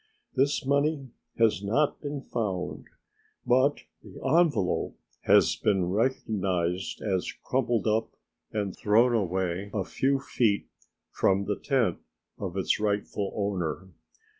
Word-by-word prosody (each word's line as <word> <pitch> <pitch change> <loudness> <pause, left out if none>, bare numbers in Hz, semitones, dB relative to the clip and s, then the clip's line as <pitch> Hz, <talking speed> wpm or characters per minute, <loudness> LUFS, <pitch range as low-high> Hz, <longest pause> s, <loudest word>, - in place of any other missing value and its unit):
This 135 +1 +1
money 140 -1 +1 0.3
has 110 -5 +3
not 140 +9 +1
been 145 -1 -4
found, 100 -6 -3 0.6
but 130 +4 +3 0.2
the - - -12 0.2
envelope 145 - +2 0.3
has - - +5
been 95 -4 +1
recognized 95 -6 -1
as 95 -4 -1
crumpled 120 -5 0
up 110 +1 +1 0.4
and 100 -3 -2
thrown 115 +4 +3
away 95 -2 -1
a 100 - +1
few 135 +8 0
feet 110 -6 +1 0.5
from 100 +1 +2
the 105 - 0
tent 125 - +1 0.4
of 95 -2 -4
its 95 - +1
rightful 100 -1 -1
owner. 95 -3 -2
105 Hz, 115 wpm, -28 LUFS, 95-130 Hz, 0.6 s, has